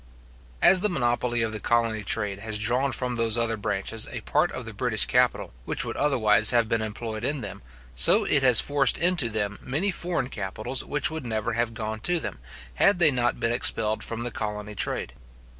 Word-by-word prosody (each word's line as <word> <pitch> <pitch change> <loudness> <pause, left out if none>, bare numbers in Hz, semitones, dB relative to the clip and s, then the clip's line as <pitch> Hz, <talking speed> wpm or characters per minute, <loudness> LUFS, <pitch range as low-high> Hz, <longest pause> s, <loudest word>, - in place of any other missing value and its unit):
As 190 - +7
the 210 +3 +1
monopoly 120 - 0
of 110 - -2
the 110 - -4
colony 115 -1 0
trade 100 -1 -2
has 110 0 -3
drawn 125 +6 +1
from 125 -1 -2
those 115 -1 0
other 115 -1 0
branches 105 +1 -2
a - - -5
part 155 +4 0
of 130 - -7
the 115 - -8
British 110 +1 +1
capital, 125 - +1
which - - -1
would - - -5
otherwise 110 -7 +3
have 120 -2 +3
been 115 0 0
employed 110 0 -5
in 140 +1 -2
them, 100 -1 -8 0.3
so 90 - +4
it 145 -7 +3
has 125 -3 +6
forced 140 -3 +3
into 170 -8 +3
them 105 -2 -3
many 160 +10 -1
foreign 170 -7 -3
capitals 110 +4 -4
which 145 +1 0
would 160 -2 -5
never 110 -2 -2
have 115 0 -1
gone 110 0 -4
to 175 +9 0
them, 110 - -6 0.3
had 195 - +3
they 165 -4 +5
not 120 -2 0
been 115 - 0
expelled 110 -3 +1
from 115 0 -3
the 120 - -3
colony 105 -1 -5
trade. 105 - -2
115 Hz, 200 wpm, -25 LUFS, 110-135 Hz, 0.3 s, As